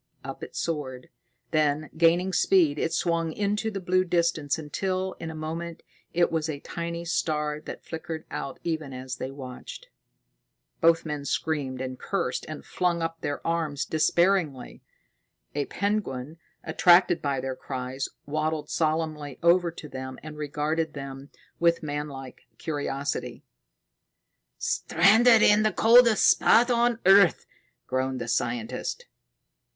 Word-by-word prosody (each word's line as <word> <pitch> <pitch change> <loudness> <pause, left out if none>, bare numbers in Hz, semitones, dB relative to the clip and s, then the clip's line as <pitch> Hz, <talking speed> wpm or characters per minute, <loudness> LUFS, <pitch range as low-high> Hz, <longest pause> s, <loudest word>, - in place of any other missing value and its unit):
Up - - -7
it - - -9
soared; 135 -6 -4 0.4
then, 155 -1 +1
gaining 170 +3 +3
speed, 160 -4 +3
it 165 - 0
swung 165 -1 0
into 210 +3 -1
the 200 -2 -4
blue 185 0 +2
distance 170 -5 0
until, 185 +5 -2
in 165 - -5
a 160 - -7
moment, 165 +2 -5 0.3
it 175 0 +2
was 160 -1 -1
a 145 -2 -4
tiny 170 +2 -5
star 150 -2 -1
that - - -8
flickered 160 -1 -6
out 135 - -5
even 160 -5 -3
as 130 0 -6
they 130 - -4
watched. 135 - -9 0.9
Both 165 0 +4
men 150 -2 -4
screamed 140 -4 -2
and 130 -1 -5
cursed 175 -10 -2
and 155 - -7
flung 175 -2 0
up 165 0 -4
their 145 - -4
arms 160 -4 -1
despairingly. 160 -3 +1 0.7
A 145 -1 -1
penguin, 165 -8 -3 0.2
attracted 175 -3 +4
by 140 -2 -1
their 130 0 -3
cries, 130 0 -5 0.2
waddled 155 +1 -2
solemnly 155 -3 -1
over 170 +1 +4
to 160 -2 -9
them 130 -1 -7
and 155 0 -8
regarded 150 +1 -2
them 135 0 -8 0.3
with 170 -1 +2
manlike 145 -3 -6
curiosity. 145 -2 -3 1.1
"Stranded 220 +6 +4
in 210 +1 +6
the 215 0 +2
coldest 230 -1 +6
spot 240 +2 +5
on 240 0 +2
earth!" 195 -2 +6 0.4
groaned 130 0 -1
the 120 - -5
scientist. 115 -1 -2
160 Hz, 135 wpm, -26 LUFS, 140-175 Hz, 1.1 s, in